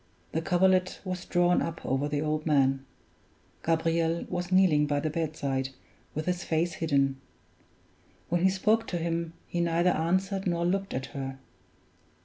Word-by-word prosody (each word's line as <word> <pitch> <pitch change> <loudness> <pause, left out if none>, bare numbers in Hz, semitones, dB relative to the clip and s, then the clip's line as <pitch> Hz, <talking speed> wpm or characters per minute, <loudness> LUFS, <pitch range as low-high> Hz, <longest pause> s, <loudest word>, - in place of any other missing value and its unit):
The 160 - -1
coverlet 185 +1 +2
was 185 -1 -4
drawn 175 0 +3
up 165 0 -4
over 135 +2 0
the 145 0 -1
old 155 0 -1
man; 135 -3 +2 0.8
Gabriel 165 0 +1
was 180 0 -3
kneeling 175 -6 +4
by 145 0 +1
the 155 +1 -2
bedside, 140 -5 -2 0.5
with 155 +1 -2
his 180 0 -1
face 165 +2 0
hidden. 140 -4 +1 1.1
When 175 0 0
she 190 - +6
spoke 215 +4 +2
to 175 - -2
him, 165 0 -2
he 175 - -1
neither 170 +1 +3
answered 190 +4 0
nor 170 -1 +1
looked 195 +2 -1
at 130 +1 -2
her. 135 -1 -4
165 Hz, 150 wpm, -28 LUFS, 150-180 Hz, 1.1 s, she